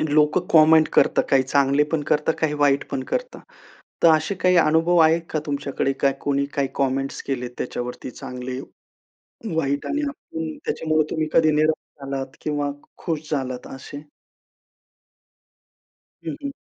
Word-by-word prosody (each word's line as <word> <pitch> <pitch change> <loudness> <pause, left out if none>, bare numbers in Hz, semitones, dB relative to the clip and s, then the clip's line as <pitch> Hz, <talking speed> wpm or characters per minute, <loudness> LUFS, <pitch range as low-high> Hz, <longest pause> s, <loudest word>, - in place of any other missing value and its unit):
लोकं 150 +3 +4
कमेंट 160 0 +7
करतात - - +4
काही 135 -1 +4
चांगले 140 +2 +3
पण 160 -2 +1
करतात, 150 +2 +2
काही 155 -2 +1
वाईट 145 -2 +2
पण 130 - -3
करतात. - - -3 0.6
तर 170 - +8
असे 155 +6 -2
काही 180 -1 +2
अनुभव 165 +2 +3
आहेत 160 +1 +4
का 155 - -1
तुमच्याकडे 140 -1 -1
काय 140 - +3
कोणी 140 0 0
काही 140 -1 0
कमेंट्स 135 0 -1
केलेत 125 -3 -3
त्याच्यावरती 125 +1 -5
चांगले 125 0 -6 0.9
वाईट 140 -3 -1
आणि 295 0 -1
आपण 160 - -6
त्याच्यामुळे 155 -1 +1
तुम्ही 155 -1 -1
कधी 155 -1 +5
निराश 150 -2 -1
आत 135 0 -8
किंवा 145 -1 -1 0.4
खुश 155 -3 -3
झालात 130 -4 -3
असे? 145 +2 -9 2.2
हं, - - -3
हं. 280 - -3
150 Hz, 140 wpm, -23 LUFS, 135-160 Hz, 2.2 s, तर